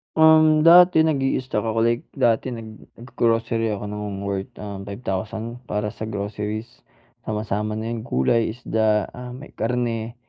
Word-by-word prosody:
Um, 155 -1 +6
dati 175 0 +7
nag-i-stock 135 -7 0
ako, 115 0 +1
like, 115 +1 +1
dati 115 0 +2
naggro-grocery 115 0 -2
ako 105 0 -6
ng 105 -1 -5
worth, 100 -1 -4
uhm, 100 -2 -7
5,000 110 +3 -4
para 105 0 -2
sa 110 0 -7
groceries. 105 +2 -5 0.4
Sama, 105 -1 -2
sama 105 0 -2
na 110 +1 -4
yung 115 0 -5
gulay, 110 - +1
isda, 110 -3 0
ah, 125 0 -9
may 135 +4 -11
karne. 115 0 -2
115 Hz, 140 wpm, -23 LUFS, 105-120 Hz, 0.4 s, dati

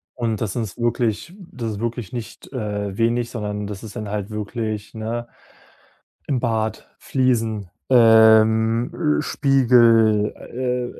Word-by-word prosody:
Und 115 -2 -2
das 105 -4 -2
ist 110 -6 -4
wirklich 120 - -1
das 125 - -6
ist 100 - -7
wirklich 115 -4 -4
nicht, 120 +1 -8
äh, 105 -5 -4
wenig, 115 +1 +1
sondern 105 -3 -4
das 105 +1 -7
ist 110 - -9
dann 105 -1 -5
halt 105 0 -4
wirklich, 110 0 -4
ne 115 +2 -4 1.0
im 135 - +1
Bad, 110 -2 -2
Fliesen, 115 -7 -1 0.2
ähm, 110 +3 +4
äh, - - 0
Spiegel, 115 -7 +4
äh, 125 0 -4
115 Hz, 130 wpm, -21 LUFS, 105-120 Hz, 1.0 s, ähm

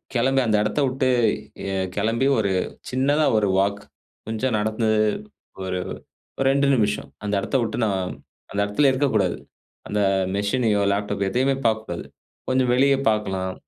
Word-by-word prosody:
கிளம்பி 135 +3 +3
அந்த 110 -1 +3
இடத்த 105 +7 -1
உட்டு 130 0 0 0.9
கிளம்பி 115 +6 +1
ஒரு 100 -2 +1 0.4
சின்னதா 145 +4 +2
ஒரு 105 - +2
வால்க், 100 +1 +1 0.5
கொஞ்சம் 110 +2 -1
நடந்து 110 +1 0 0.8
ஒரு 90 0 -2 0.7
2 140 +1 +3
நிமிஷம் 105 -3 0
அந்த 105 - -2
எடத்த 135 - -4
விட்டு 115 - -2
நான், 95 -3 -1 0.4
அந்த 100 - -4
எடத்துலே 135 +7 +3
இருக்கக்கூடாது. 130 -6 +1 0.5
அந்த 105 0 -1 0.3
மிஷினையோ, 105 0 +1
லேப்டாப் 100 -1 -1
எதையுமே 130 +5 +1
பார்க்கக்கூடாது. 110 -1 -1 0.4
கொஞ்சம் 130 -1 +2
வெளிய 135 +2 +4
பார்க்கலாம். 95 -3 -1
110 Hz, 125 wpm, -23 LUFS, 100-130 Hz, 0.9 s, வெளிய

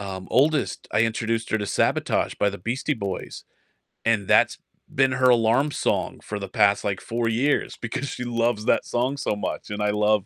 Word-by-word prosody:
um, 95 -2 -6
oldest, 145 +2 +1
I - - +3
introduced 115 0 -1
her 110 - +1
to 105 - -3
"Sabotage" - - 0
by 100 - +1
the 100 - -8
Beastie 125 +9 -2
Boys, 100 -5 -5 0.6
and 110 -3 +2
that's - - +4 0.4
been 135 -1 +3
her 130 0 +3
alarm 120 +5 +3
song - - -1
for 105 - -5
the 100 - -5
past, 100 +1 +3
like, 100 -1 -2
4 115 0 -2
years 130 +6 0
because 115 +4 -3
she 125 - -5
loves 115 -2 0
that - - +2
song 130 +4 -1
so 105 - -1
much, 105 +2 -5
and 105 0 -3
I 105 - +2
love 105 -1 +2
115 Hz, 195 wpm, -24 LUFS, 105-125 Hz, 0.6 s, that's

